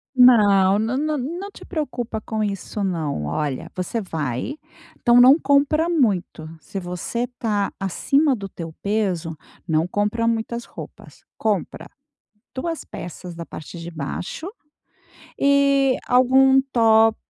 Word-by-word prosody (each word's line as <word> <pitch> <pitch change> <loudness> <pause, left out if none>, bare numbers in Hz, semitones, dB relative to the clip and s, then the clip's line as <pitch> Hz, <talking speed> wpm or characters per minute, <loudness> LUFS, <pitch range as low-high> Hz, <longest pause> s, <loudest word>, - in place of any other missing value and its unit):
Não, 205 -6 +6
nã 225 +4 -1
nã 305 +1 0
não 340 +10 -5
te - - -13
preocupa 250 -9 -4
com 220 0 -3
isso, 200 0 -3
não. 160 - -2
Olha, 135 - -3
você 185 +5 -3
vai, 155 - -4 0.4
então 240 +1 +6
não 260 +4 +8
compra 285 +3 +2
muito, 205 - 0
se 195 +6 -6
você 180 +7 -3
tá 205 -3 -1
acima 275 - +1
do 200 -3 -7
teu 165 -3 -8
peso, 190 -6 -1 0.3
não 160 0 +1
compra 210 +4 0
muitas 230 +1 -2
roupas. - - -12
Compra 210 -5 -2 0.7
2 325 +5 -4
peças 175 +1 -8
da 170 0 -7
parte 160 +3 -9
de 170 +1 -7
baixo, 165 - -5 0.9
e 275 -1 +3
algum 265 +2 +5
top 225 -1 +5
220 Hz, 130 wpm, -22 LUFS, 180-260 Hz, 0.9 s, não